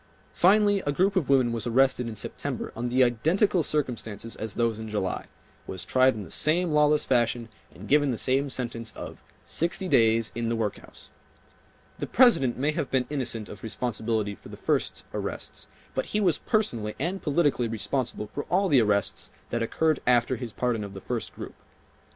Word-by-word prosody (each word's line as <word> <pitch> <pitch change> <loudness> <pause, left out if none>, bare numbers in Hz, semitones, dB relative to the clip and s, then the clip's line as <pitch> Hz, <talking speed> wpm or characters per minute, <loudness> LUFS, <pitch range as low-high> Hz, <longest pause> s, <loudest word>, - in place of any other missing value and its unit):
Finally 205 +2 +4
a - - +3
group 190 +7 +1
of 175 -8 0
women 130 -3 +4
was 115 +1 -2
arrested 130 0 +2
in 115 - -5
September - - -4
under 120 +2 -2
the 130 +2 +4
identical 165 - +2
circumstances 115 -7 -2
as 110 -1 -4
those 115 -2 0
in 110 0 -6
July, 105 -3 -2 0.4
was 95 - -4
tried 130 0 +3
in 105 - -5
the 80 - -12
same 170 +2 +2
lawless 150 0 +3
fashion 120 -2 +1 0.2
and 100 +4 -11
given 145 0 +4
the 120 - -1
same 135 +4 +1
sentence 115 -3 -3
of - - -9 0.2
"sixty 175 +3 -1
days 115 -6 +3
in 115 0 -2
the 115 - 0
workhouse." 110 -2 -5 0.9
The - - -3
President 225 - +4
may 145 +4 +1
have 150 -4 -3
been 130 -1 +1
innocent 120 -6 -2
of 105 - -10
responsibility 110 -1 -2
for - - -14
the - - -9
first - - -1
arrests, - - -5 0.3
but - - -2
he 210 - -1
was 180 -7 +2
personally 115 - -1
and 180 +7 -2
politically 145 -5 +1
responsible 115 -1 -2
for 145 - -4
all 190 +2 +1
the 135 -5 +5
arrests 100 -3 0 0.2
that 120 - -1
occurred 155 +6 +1
after 125 +1 +3
his 120 -2 -6
pardon 120 -1 -1
of 100 -1 -8
the - - -6
first, 120 0 -4
group. - - -8
125 Hz, 180 wpm, -27 LUFS, 115-150 Hz, 0.9 s, the